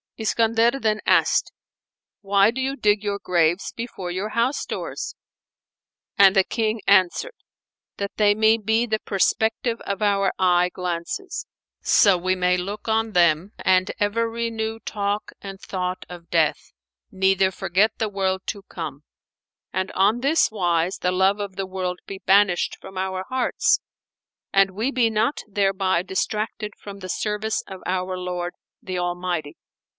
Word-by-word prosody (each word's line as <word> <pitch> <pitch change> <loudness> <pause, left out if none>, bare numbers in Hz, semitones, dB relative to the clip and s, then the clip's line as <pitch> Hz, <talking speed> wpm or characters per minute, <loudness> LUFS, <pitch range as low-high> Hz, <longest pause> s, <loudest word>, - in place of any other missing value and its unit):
Iskandar 230 +3 +2
then 215 -3 +1
asked - - +3 0.7
"Why 200 +1 +4
do 260 +2 -4
you 270 +1 -1
dig 210 -4 +2
your 205 -1 -1
graves 175 -2 +1
before 215 -7 -5
your 190 +4 -3
house 235 +6 0
doors?"; - - -5 1.0
and 200 -3 +6
the 195 - +5
King 220 +1 -1
answered, 195 - +3 0.6
"That 200 0 -5
they 205 -1 +4
may 220 +1 +4
be 220 +2 +1
the 215 -2 -1
prospective 220 +4 0
of 200 +1 -3
our 200 -1 +2
eye 180 -1 +3
glances; 180 - -4 0.3
so 200 -3 +5
we 185 +1 0
may 180 0 +2
look 200 +5 -5
on 220 0 0
them 175 +3 +3
and 185 0 +2
ever 230 +3 +1
renew 225 -1 -3
talk 205 0 -3
and 195 -1 -8
thought 185 -1 -4
of 175 -1 -11
death, 165 -2 +1 0.4
neither 190 0 +3
forget 190 +3 +1
the 220 - -1
world 190 -1 -1
to 200 - -4
come; 150 -4 -6 0.7
and 190 0 -1
on 205 +5 +2
this 280 -1 +3
wise 175 -3 0
the 180 - 0
love 190 +2 +2
of 200 -2 -5
the 195 -1 -3
world 185 -1 -3
be 195 - -7
banished 195 -2 +3
from 190 - -12
our 190 0 -2
hearts 255 -1 +2 0.7
and 195 0 +4
we 220 +8 -1
be 245 -4 +2
not 220 +6 0
thereby 195 -3 +1
distracted 210 +2 -3
from 200 -1 -10
the 185 -1 -8
service 210 +3 -1
of 190 -1 -9
our 185 0 -1
Lord, 180 -1 -4 0.3
the 185 -1 -3
Almighty." 175 -3 -3
195 Hz, 150 wpm, -23 LUFS, 185-220 Hz, 1.0 s, and